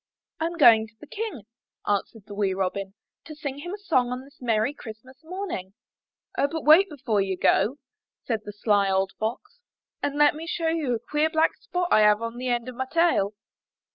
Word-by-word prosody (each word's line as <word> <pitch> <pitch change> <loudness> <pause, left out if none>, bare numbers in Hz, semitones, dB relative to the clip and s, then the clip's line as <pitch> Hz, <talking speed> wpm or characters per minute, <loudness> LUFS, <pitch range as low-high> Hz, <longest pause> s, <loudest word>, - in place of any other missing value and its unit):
'' - - -63
'Tm 335 +1 -2
going 225 -7 +7
to 215 - -24
the - - -11
King/' 410 - -6 0.4
answered 205 +1 -1
the 205 - -10
wee 200 -2 0
Robin, 195 +1 -3 0.3
'*to 310 - -10
sing 285 -2 -5
him 350 +4 -6
a 405 - -5
song 260 -12 +1
on 250 +1 -4
this 280 +1 -20
merry 230 +2 +1
Christmas 255 +3 -12
morning." 320 - -5 0.6
*'0h, 280 - +3
but 320 +2 -4
wait 330 +6 +7
before 250 -9 -1
you 190 -1 -2
go," 250 +8 +2 0.5
said 225 -4 -2
the 205 - -7
sly 205 -1 +2
old 190 0 +1
Fox, 420 - -4 0.4
''and 285 0 -2
let 295 0 +5
me 320 +2 -8
show 330 0 -1
you 305 -7 0
a - - -4
queer 300 +1 +2
black 320 0 +2
spot 355 0 -3
I - - +6
have 210 0 +5
on 230 +1 -5
the 255 +1 -4
end 240 -1 0
of 255 - -6
my 260 +2 -4
tail." 330 - +2
250 Hz, 205 wpm, -25 LUFS, 210-315 Hz, 0.6 s, going